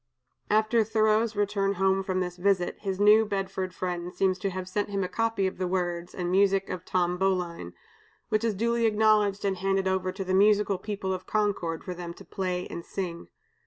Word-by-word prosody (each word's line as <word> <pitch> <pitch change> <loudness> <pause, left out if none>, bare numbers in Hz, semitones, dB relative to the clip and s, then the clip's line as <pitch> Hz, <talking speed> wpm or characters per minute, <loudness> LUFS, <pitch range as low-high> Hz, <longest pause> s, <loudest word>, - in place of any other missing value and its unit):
'" - - -51
After 215 +2 +3
Thoreau's 220 +1 +2
return 200 -1 +1
home 190 +1 +2
from 185 -1 -1
this 180 0 -4
visit, 185 -1 +1
his 195 -2 -3
New 210 +2 +6
Bedford 195 -2 -3
friend 180 -1 -4
seems 185 0 0
to 195 - -1
have 185 0 -5
sent 205 +2 -2
him 200 -1 -1
a - - -1
copy 225 -1 0
of 190 - -3
the 185 - 0
words 175 -1 -2
and 175 -1 -2
music 195 0 +3
of 180 - -5
"Tom 180 -1 0
Bowline," 180 - -1 0.6
which 215 +1 +1
was 225 -3 0
duly 235 +2 +1
acknowledged 210 -2 +2
and 195 -1 0
handed 195 0 0
over 190 0 0
to 190 +1 -5
the 185 0 -2
musical 205 0 +4
people 200 -3 -3
of 185 0 -6
Concord 200 -6 -1
for 180 - -5
them 175 -1 -7
to - - -13
play 180 -2 -3
and 170 - -7
sing. 170 -2 -5
195 Hz, 200 wpm, -27 LUFS, 180-205 Hz, 0.6 s, New